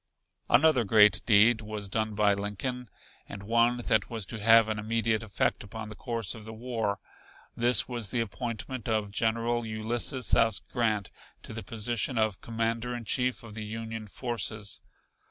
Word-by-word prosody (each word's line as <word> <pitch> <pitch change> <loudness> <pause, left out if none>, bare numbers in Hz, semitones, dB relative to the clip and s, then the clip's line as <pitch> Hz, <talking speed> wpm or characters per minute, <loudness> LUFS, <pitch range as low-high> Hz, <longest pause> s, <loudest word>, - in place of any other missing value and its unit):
Another 145 -4 +5
great 105 0 +5
deed 110 +1 +5
was 105 -1 -5
done 110 +2 -2
by 105 -1 +4
Lincoln 105 +5 -4 0.4
and 100 0 -8
one 115 +3 +3
that 110 -3 +2
was 115 -4 -2
to 115 +4 -7
have 115 +1 +6
an 110 -1 -2
immediate 110 0 0
effect 110 -2 -1
upon 105 +1 -8
the 105 - -8
course 115 -4 -3
of 110 - -10
the 110 +1 -8
war. 115 -4 -2 0.6
This 120 -3 +4
was 120 -5 -3
the 125 - -1
appointment 115 +2 -4
of 105 -2 0
General 115 +2 0
Ulysses 115 +3 -1
S. 115 -4 +4
Grant 110 -5 -1 0.3
to - - -7
the 110 - -4
position 115 +3 -2
of 110 -3 0
Commander 115 +1 -2
in 120 -1 -7
Chief 125 +3 0
of 110 -2 -9
the 110 0 -5
Union 110 0 -6
forces. 110 -2 -3
110 Hz, 165 wpm, -29 LUFS, 105-120 Hz, 0.6 s, have